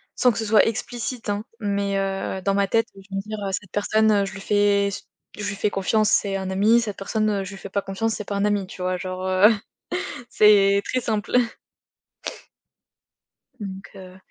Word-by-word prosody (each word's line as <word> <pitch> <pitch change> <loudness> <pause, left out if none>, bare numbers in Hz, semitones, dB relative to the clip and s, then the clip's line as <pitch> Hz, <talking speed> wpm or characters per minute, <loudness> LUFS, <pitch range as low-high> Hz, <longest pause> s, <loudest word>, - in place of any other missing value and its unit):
sans 250 - +4
que - - -7
ce - - -1
soit 215 0 +5
explicite, 230 0 -4
hein, 205 +2 -2 0.2
mais, 200 -1 0
heu, 195 -1 -2
dans 195 0 +1
ma 200 -1 +2
tête, 225 +3 +2
oui, 195 - -13
je 195 - -6
vais - - -1
me - - -1
dire: 215 0 -6
«Heu, - - -2
cette 190 -1 -4
personne, 210 0 +2
je 195 - -7
lui 195 - -8
fais 200 -1 +2
se 200 - -6 0.3
je 210 0 -3
lui 200 - -3
fais 205 - 0
confiance, 210 +2 +2
c'est 195 -1 +2
un 190 -1 -4
ami, 215 +5 +4
cette 210 -3 -4
personne, 215 +2 0
heu, 200 -2 0
je 195 - -7
lui 195 - -9
fais 195 - -9
pas 200 +1 -1
confiance, 210 +4 -2
c'est 210 - -6
pas 200 - -4
un 200 - 0
ami, 205 -2 0
tu 185 - -10
vois? 185 0 0
Genre, 185 0 -5
heu, 185 +2 +6 0.8
c'est 200 -2 +5
très 255 - 0
simple. 215 +1 -1 2.2
Donc, 195 -1 -7
heu 185 -1 -11
200 Hz, 215 wpm, -23 LUFS, 195-215 Hz, 2.2 s, heu